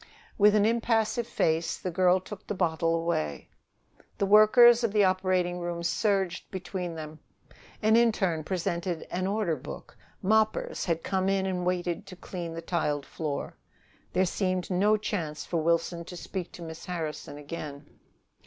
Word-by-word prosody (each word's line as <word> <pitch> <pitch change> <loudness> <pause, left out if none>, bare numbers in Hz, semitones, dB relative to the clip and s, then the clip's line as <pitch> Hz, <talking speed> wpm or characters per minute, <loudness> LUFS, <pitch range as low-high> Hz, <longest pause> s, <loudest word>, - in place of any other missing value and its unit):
With 210 0 +5
an 210 -1 +4
impassive 230 0 +1
face, 160 +1 0
the 185 - -4
girl 180 +1 +4
took 195 +2 -10
the 210 - -2
bottle 165 -2 +1
away. 120 - -2 0.7
The 200 - +1
workers 230 +4 +7
of 225 -3 0
the 210 -1 +4
operating 185 -1 +1
room 175 -1 -4
surged 190 0 0
between 185 -2 -5
them. 155 0 -8 0.6
An 220 +1 +5
interne 195 -9 +2
presented 175 0 -2
an 185 +1 -1
order 200 -5 0
book; 145 +1 -9 0.3
moppers 220 +2 +1
had 165 -2 -1
come 190 0 0
in 195 -1 +1
and 180 -2 -1
waited 175 -2 -1
to 185 - -9
clean 170 -2 -6
the 165 - -6
tiled 150 -5 -1
floor. 150 -3 -4 0.6
There 185 +1 +3
seemed 185 0 -1
no 205 +4 +3
chance 165 -8 -3
for 170 - -2
Wilson 170 +1 0
to 180 - -8
speak 180 0 -5
to 175 - -9
Miss 160 0 -8
Harrison 155 -5 -4
again. 145 -1 -8
180 Hz, 155 wpm, -28 LUFS, 165-200 Hz, 0.7 s, workers